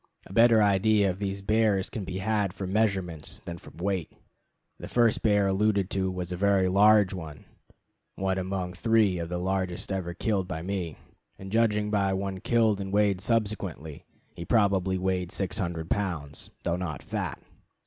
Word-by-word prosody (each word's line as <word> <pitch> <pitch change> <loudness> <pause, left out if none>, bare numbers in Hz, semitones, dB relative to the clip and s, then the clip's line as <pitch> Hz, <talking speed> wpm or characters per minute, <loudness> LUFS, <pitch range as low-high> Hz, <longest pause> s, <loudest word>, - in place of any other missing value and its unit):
A - - -11
better 115 0 +6
idea 100 0 +3
of 90 - -8
these 100 -1 -3
bears 105 -2 +2
can 110 - -4
be 95 - -4
had 105 -1 0
from 95 -1 -5
measurements 95 -8 -1
than 85 0 -6
from - - -15
weight. 95 -2 -2 0.7
The - - -7
bear - - -14
first 120 -2 +3
alluded 100 -1 +2
to 95 -1 0
was 90 -1 -4
a - - -2
very 100 0 +3
large 100 +1 +5
one 80 -5 -8 0.7
(one 95 0 -1
among 95 -1 -3
three 105 -2 +2
of 85 0 -4
the 90 - -2
largest 95 0 -2
ever 90 -3 -3
killed 100 -2 -1
by 80 -3 -5
me), 90 -4 -3 0.4
and, 95 0 -9
judging 105 -2 +2
by 100 -2 +1
one 95 0 -3
killed 110 -2 +2
and 95 0 -5
weighed 100 -2 +2
subsequently, 100 -9 -2 0.3
he 85 - -7
probably 95 -3 +2
weighed 90 -1 -1
600 85 -4 -3
pounds, 85 -8 -2
though 85 0 0
not 85 -5 -5
fat. - - -4
95 Hz, 170 wpm, -27 LUFS, 90-105 Hz, 0.7 s, better